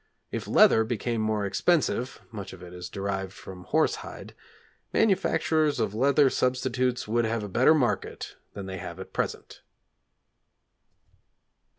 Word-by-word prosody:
If -, -, -4 dB
leather 110 Hz, -, +6 dB
became 115 Hz, 0 st, -2 dB
more 110 Hz, -1 st, 0 dB
expensive 130 Hz, -, 0 dB
(much 100 Hz, -4 st, -7 dB
of 90 Hz, -, -11 dB
it 90 Hz, 0 st, -10 dB
is 90 Hz, 0 st, -7 dB
derived 95 Hz, -1 st, -3 dB
from 90 Hz, -2 st, -11 dB
horse -, -, +2 dB
hide) -, -, -9 dB, 0.6 s
manufacturers 160 Hz, -, +2 dB
of 110 Hz, -3 st, 0 dB
leather 140 Hz, +5 st, +4 dB
substitutes 125 Hz, -1 st, 0 dB
would 120 Hz, +2 st, +1 dB
have 110 Hz, -1 st, -1 dB
a -, -, -4 dB
better 125 Hz, +10 st, +4 dB
market 130 Hz, -6 st, -1 dB, 0.2 s
than 100 Hz, -, -6 dB
they 95 Hz, -1 st, -6 dB
have 85 Hz, +1 st, -7 dB
at 95 Hz, -, -9 dB
present. -, -, -4 dB
110 Hz, 135 wpm, -27 LUFS, 95-130 Hz, 0.6 s, leather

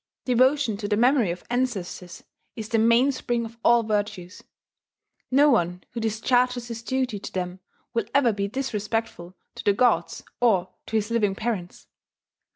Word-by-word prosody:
Devotion 255 Hz, -2 st, +2 dB
to 205 Hz, 0 st, -4 dB
the 210 Hz, 0 st, +1 dB
memory 245 Hz, -3 st, +3 dB
of 175 Hz, +1 st, -5 dB
ancestors 210 Hz, -8 st, -3 dB, 0.3 s
is 220 Hz, -2 st, -6 dB
the 225 Hz, -, +2 dB
mainspring 235 Hz, +1 st, +2 dB
of 230 Hz, +1 st, -11 dB
all 235 Hz, -1 st, +5 dB
virtues. 205 Hz, -4 st, -3 dB, 0.9 s
No 285 Hz, +3 st, +5 dB
one 180 Hz, -5 st, 0 dB
who 240 Hz, -, -5 dB
discharges 245 Hz, +2 st, 0 dB
his 230 Hz, -1 st, -5 dB
duty 255 Hz, -3 st, -2 dB
to -, -, -8 dB
them 180 Hz, 0 st, -4 dB, 0.3 s
will 230 Hz, -3 st, 0 dB
ever 260 Hz, -5 st, +3 dB
be 200 Hz, -1 st, -2 dB
disrespectful 215 Hz, -6 st, -4 dB, 0.2 s
to -, -, -9 dB
the 205 Hz, -, +3 dB
gods 245 Hz, +3 st, +1 dB, 0.2 s
or 195 Hz, -7 st, +2 dB
to -, -, -4 dB
his 215 Hz, +1 st, 0 dB
living 210 Hz, -4 st, +1 dB
parents. 205 Hz, -5 st, -4 dB
225 Hz, 155 wpm, -25 LUFS, 200-245 Hz, 0.9 s, all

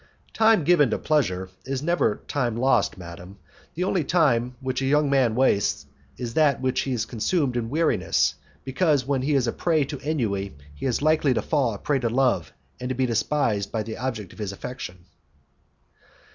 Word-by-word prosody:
"Time 220 Hz, -5 st, +4 dB
given 150 Hz, -4 st, +4 dB
to -, -, 0 dB
pleasure 95 Hz, -12 st, 0 dB
is 135 Hz, +1 st, -3 dB
never 165 Hz, -10 st, +1 dB
time 120 Hz, -5 st, -1 dB
lost, 130 Hz, -3 st, +2 dB
madam; 90 Hz, +2 st, -10 dB, 0.4 s
the 175 Hz, -, -1 dB
only 185 Hz, -3 st, +1 dB
time 125 Hz, -7 st, +2 dB
which 130 Hz, 0 st, -2 dB
a -, -, 0 dB
young 145 Hz, 0 st, +2 dB
man 130 Hz, -5 st, +3 dB
wastes 125 Hz, -6 st, +2 dB, 0.3 s
is 120 Hz, -2 st, -5 dB
that 150 Hz, -3 st, +3 dB
which 130 Hz, +1 st, -1 dB
is 125 Hz, -4 st, -1 dB
consumed 130 Hz, +3 st, -1 dB
in 115 Hz, -2 st, -2 dB
weariness, 160 Hz, +4 st, +1 dB, 0.3 s
because 145 Hz, 0 st, +1 dB
when 135 Hz, -1 st, 0 dB
he 145 Hz, +2 st, +1 dB
is 130 Hz, -3 st, +2 dB
a 115 Hz, -, 0 dB
prey 160 Hz, -4 st, +1 dB
to 140 Hz, 0 st, -6 dB
ennui 100 Hz, -, -2 dB, 0.2 s
he 70 Hz, -, -4 dB
is 125 Hz, +2 st, -1 dB
likely 155 Hz, -4 st, +3 dB
to 110 Hz, -, +1 dB
fall 135 Hz, -8 st, +1 dB
a -, -, -6 dB
prey 140 Hz, +6 st, 0 dB
to 120 Hz, -2 st, 0 dB
love, 130 Hz, +1 st, +1 dB, 0.3 s
and 125 Hz, -, -4 dB
to 130 Hz, -, -2 dB
be 130 Hz, +1 st, +1 dB
despised 115 Hz, -3 st, 0 dB
by 110 Hz, -2 st, -1 dB
the 110 Hz, +1 st, -6 dB
object 115 Hz, -7 st, -4 dB
of -, -, -16 dB
his 105 Hz, -2 st, -3 dB
affection." 95 Hz, -5 st, -8 dB
130 Hz, 185 wpm, -24 LUFS, 115-145 Hz, 0.4 s, Time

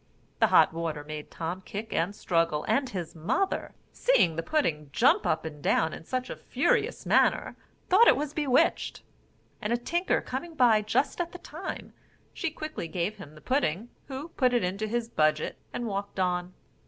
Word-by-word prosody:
The -, -, +5 dB
hot -, -, +5 dB
water 160 Hz, -3 st, -3 dB
made 150 Hz, 0 st, -7 dB
Tom 170 Hz, +3 st, -4 dB
kick 210 Hz, +3 st, -6 dB
and 205 Hz, -, 0 dB
struggle; 165 Hz, -5 st, 0 dB
and 275 Hz, -2 st, +1 dB
his 175 Hz, -4 st, -5 dB
mother, 280 Hz, -, -1 dB, 0.2 s
seeing 180 Hz, -, +3 dB
the 165 Hz, -, -1 dB
pudding 165 Hz, -, 0 dB
jump -, -, +3 dB
up 160 Hz, +1 st, 0 dB
and 150 Hz, -2 st, -7 dB
down 160 Hz, +2 st, +2 dB
in -, -, -9 dB
such 255 Hz, +4 st, -2 dB
a -, -, -4 dB
furious 470 Hz, -1 st, 0 dB
manner, -, -, +3 dB, 0.3 s
thought 415 Hz, +6 st, +6 dB
it -, -, +7 dB
was 295 Hz, 0 st, -3 dB
bewitched; 280 Hz, -5 st, +1 dB, 0.6 s
and 210 Hz, -, -2 dB
a 235 Hz, -, +3 dB
tinker 345 Hz, +9 st, 0 dB
coming 320 Hz, +6 st, -5 dB
by 235 Hz, -6 st, +5 dB
just 220 Hz, +10 st, 0 dB
at 345 Hz, 0 st, -4 dB
the -, -, -6 dB
time, 345 Hz, +1 st, -7 dB, 0.4 s
she 370 Hz, -, -2 dB
quickly 310 Hz, -, -6 dB
gave 180 Hz, +5 st, -2 dB
him 155 Hz, -6 st, -11 dB
the 155 Hz, -, -14 dB
pudding, 240 Hz, -, 0 dB, 0.2 s
who 280 Hz, +4 st, -6 dB
put 255 Hz, -6 st, +2 dB
it 240 Hz, -, +2 dB
into 195 Hz, +4 st, -2 dB
his 235 Hz, +1 st, -1 dB
budget 155 Hz, -7 st, +1 dB
and 240 Hz, -, -4 dB
walked 200 Hz, -2 st, -4 dB
on. 180 Hz, 0 st, 0 dB
210 Hz, 180 wpm, -28 LUFS, -, 0.6 s, it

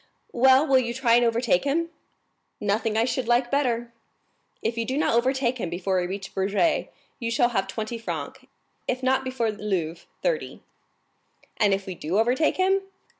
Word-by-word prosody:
"Well, 260 Hz, +3 st, +5 dB
will 270 Hz, -3 st, +4 dB
you 235 Hz, -1 st, -2 dB
try 245 Hz, -2 st, +2 dB
and 240 Hz, +1 st, +5 dB
overtake 230 Hz, -5 st, +2 dB
him?" 330 Hz, +4 st, 0 dB, 0.7 s
"Nothing 215 Hz, +2 st, 0 dB
I 225 Hz, -, +3 dB
should 255 Hz, -1 st, -2 dB
like 240 Hz, +1 st, +2 dB
better." 240 Hz, -4 st, 0 dB, 0.7 s
"If 225 Hz, -, -1 dB
you 230 Hz, -, -1 dB
do 260 Hz, +4 st, -2 dB
not 305 Hz, -, +2 dB
overtake 255 Hz, +1 st, +1 dB
him 180 Hz, -, -2 dB
before 185 Hz, +2 st, -1 dB
we 180 Hz, -, -2 dB
reach 195 Hz, +1 st, -6 dB
Bourget 200 Hz, -, +1 dB, 0.3 s
you 230 Hz, -2 st, -2 dB
shall 240 Hz, +1 st, +3 dB
have 195 Hz, -5 st, -1 dB
twenty 220 Hz, +3 st, -4 dB
francs; 225 Hz, -, -5 dB, 0.5 s
if 255 Hz, +1 st, -2 dB
not 265 Hz, +1 st, +2 dB
before 255 Hz, -4 st, -1 dB
Louvres, 185 Hz, -6 st, -3 dB, 0.2 s
thirty." -, -, -2 dB, 0.9 s
"And 210 Hz, -3 st, +3 dB
if 195 Hz, 0 st, 0 dB
we 190 Hz, -, -5 dB
do 170 Hz, +2 st, -2 dB
overtake 250 Hz, +8 st, +2 dB
him?" 385 Hz, +1 st, +3 dB
235 Hz, 175 wpm, -25 LUFS, 205-260 Hz, 0.9 s, Well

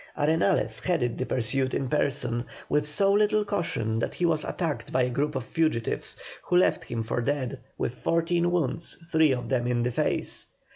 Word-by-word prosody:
Arenales 160 Hz, +6 st, +2 dB
headed 135 Hz, -10 st, 0 dB
the 130 Hz, -, -2 dB
pursuit 130 Hz, +2 st, +1 dB
in 135 Hz, -, -1 dB
person 130 Hz, -4 st, 0 dB, 0.2 s
with 150 Hz, 0 st, +1 dB
so 195 Hz, +6 st, +4 dB
little 210 Hz, 0 st, +3 dB
caution 115 Hz, -, -1 dB
that -, -, -2 dB
he 175 Hz, -, 0 dB
was 160 Hz, -3 st, +2 dB
attacked 150 Hz, -9 st, -3 dB
by 130 Hz, -, +2 dB
a 125 Hz, -, 0 dB
group 145 Hz, +4 st, -1 dB
of 130 Hz, -, -2 dB
fugitives, 155 Hz, -5 st, -1 dB, 0.2 s
who 180 Hz, -, +1 dB
left 180 Hz, -, +2 dB
him 115 Hz, -1 st, -3 dB
for 115 Hz, +2 st, -2 dB
dead 135 Hz, -1 st, -2 dB, 0.2 s
with -, -, -2 dB
fourteen 170 Hz, +1 st, +1 dB
wounds, 170 Hz, -2 st, -1 dB
three 160 Hz, -2 st, +4 dB
of 125 Hz, -2 st, -2 dB
them 125 Hz, -2 st, 0 dB
in 120 Hz, -1 st, +1 dB
the 125 Hz, -, 0 dB
face. -, -, 0 dB
145 Hz, 185 wpm, -27 LUFS, 125-170 Hz, 0.2 s, so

